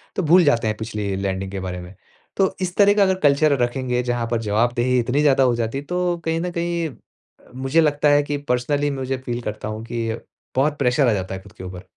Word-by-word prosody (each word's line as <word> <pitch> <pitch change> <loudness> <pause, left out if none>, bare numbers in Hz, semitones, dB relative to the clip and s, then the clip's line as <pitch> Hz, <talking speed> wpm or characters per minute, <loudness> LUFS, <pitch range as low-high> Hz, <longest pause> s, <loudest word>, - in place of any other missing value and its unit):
तो 190 - -1
भूल 175 +3 +6
जाते 115 -6 +2
हैं 105 -1 -1
पिछली 105 -3 -3
लैंडिंग 95 0 -3
के 100 - -4
बारे 90 -1 -4
में। 90 +2 -11 0.4
तो 190 -1 +2
इस 180 -1 -2
तरह 205 0 +6
का 205 -1 +4
अगर 190 -1 +2
कल्चर 145 0 +4
रखेंगे 125 0 -1
जहाँ 120 -1 -1
पर 115 -1 0
जवाबदेही 120 +4 +1
इतनी 125 +4 +1
ज़्यादा 135 -2 +4
हो 125 -2 +3
जाती 115 +2 -2
है, 140 - -4
तो 180 +1 -1
कहीं 165 0 0
न 180 +1 -3
कहीं 170 -1 -1
अ, 130 - -13 0.6
मुझे 135 +5 +2
लगता 150 -1 +2
है 145 0 +4
कि 145 0 -2
पर्सनली 145 +4 0
मुझे 135 -1 -3
फ़ील 120 0 -3
करता 105 -2 -5
हूँ 110 +1 -5
कि 115 -1 -3 0.5
बहुत 145 +3 +1
प्रेशर 130 0 +3
आ 115 - +3
जाता 95 -1 -3
है 95 - -8
ख़ुद 100 0 -16
के 110 - -11
ऊपर। 90 0 -8
125 Hz, 235 wpm, -22 LUFS, 110-150 Hz, 0.6 s, भूल